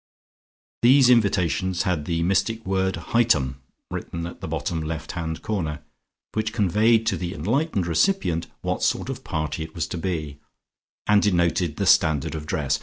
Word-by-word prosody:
These 125 +1 +6
invitations 95 -5 +2
had 85 -5 -1
the 85 0 -1
mystic 110 +5 0
word 95 0 0 0.2
"Hightum" 75 - +2 0.3
written 85 0 -5
at 85 - -9
the - - -5
bottom 80 -2 -2
left 80 0 -4
hand 80 -2 -4
corner, 80 -8 -3 0.5
which 110 0 -1
conveyed 110 +2 +3
to - - +1
the 90 -2 -4
enlightened 105 - 0
recipient 85 - +1
what - - -2
sort - - 0
of - - -5
party 80 0 -3
it 80 0 -7
was 85 - -1
to 85 - -4
be, 80 -5 -3 0.7
and 105 -1 +4
denoted 85 -4 +1
the - - 0
standard 75 -3 +3
of 75 -1 -6
dress. 75 -2 0
85 Hz, 160 wpm, -24 LUFS, 80-105 Hz, 0.7 s, These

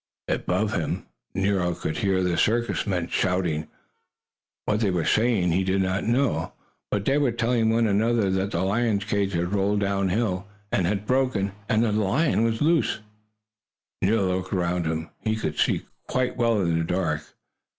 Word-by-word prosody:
Up - - 0
above 100 +4 0
him - - -2 0.3
Nero 95 -2 +1
could 80 - -3
hear 95 -4 +1
the 90 -1 +1
circus 120 +4 +1
men 90 -4 -1
shouting. 90 -4 0 1.0
What 105 - +1
they 110 -3 +2
were 90 -3 0
saying 110 -6 +2
he 95 +3 +2
did 95 +1 +1
not 95 +1 -1
know, 120 - +1 0.4
but 100 -1 -1
they 140 +2 +3
were 140 -4 +2
telling 115 -1 +1
one 115 +1 +3
another 110 0 +2
that 95 +1 0
the 85 -2 -1
lion's 105 +1 +1
cage 100 -2 -1
had 90 +3 -1
rolled 100 +1 +1
downhill, 100 0 0 0.3
had 100 +2 0
broken, 125 -6 +1 0.2
and 110 -1 +3
that 115 - +1
the 105 +1 +1
lion 115 +5 +2
was 115 +2 0
loose. 165 +1 +2 1.0
Nero 100 0 +2
looked 95 - -6
around 90 -2 0
him. 80 +1 -3
He 110 0 -1
could 110 - -3
see - - +1 0.2
quite 130 -1 0
well 115 -3 +2
in 85 -2 +1
the - - 0
dark. 80 -3 -1
100 Hz, 170 wpm, -25 LUFS, 90-115 Hz, 1.0 s, they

